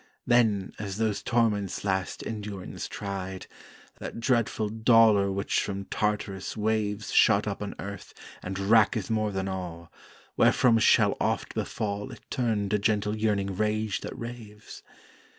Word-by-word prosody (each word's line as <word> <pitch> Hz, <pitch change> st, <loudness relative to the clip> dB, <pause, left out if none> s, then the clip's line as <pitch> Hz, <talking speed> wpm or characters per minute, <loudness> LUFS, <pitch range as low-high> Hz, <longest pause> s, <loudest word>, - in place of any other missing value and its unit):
Then, 110 Hz, -5 st, +3 dB
as 100 Hz, -2 st, -4 dB
those 110 Hz, -2 st, 0 dB
torments 105 Hz, -5 st, 0 dB
last 95 Hz, -2 st, -2 dB
endurance 105 Hz, -4 st, -5 dB
tried, 95 Hz, -2 st, -5 dB, 0.5 s
That -, -, -6 dB
dreadful 115 Hz, -3 st, +1 dB
dolour 110 Hz, -3 st, +4 dB
which 100 Hz, +1 st, 0 dB
from 100 Hz, -1 st, -4 dB
Tartarus's 105 Hz, -2 st, -2 dB
waves 110 Hz, -1 st, -1 dB
Shot 105 Hz, -2 st, +5 dB
up 100 Hz, -1 st, -3 dB
on 105 Hz, -, -5 dB
earth 100 Hz, -1 st, -8 dB, 0.3 s
and 95 Hz, +1 st, -5 dB
racketh 105 Hz, +1 st, +3 dB
more 110 Hz, -1 st, +1 dB
than 95 Hz, -1 st, -2 dB
all, 90 Hz, -3 st, -6 dB, 0.4 s
Wherefrom 115 Hz, -2 st, +4 dB
shall -, -, +4 dB
oft -, -, -1 dB
befall 105 Hz, -1 st, -3 dB
It -, -, -11 dB
turn 110 Hz, -5 st, 0 dB
to 105 Hz, +1 st, +1 dB
gentle 105 Hz, 0 st, +1 dB
yearning 100 Hz, -3 st, 0 dB
rage 105 Hz, 0 st, -1 dB
that -, -, -7 dB
raves? 115 Hz, -3 st, -9 dB
105 Hz, 135 wpm, -27 LUFS, 100-110 Hz, 0.5 s, Shot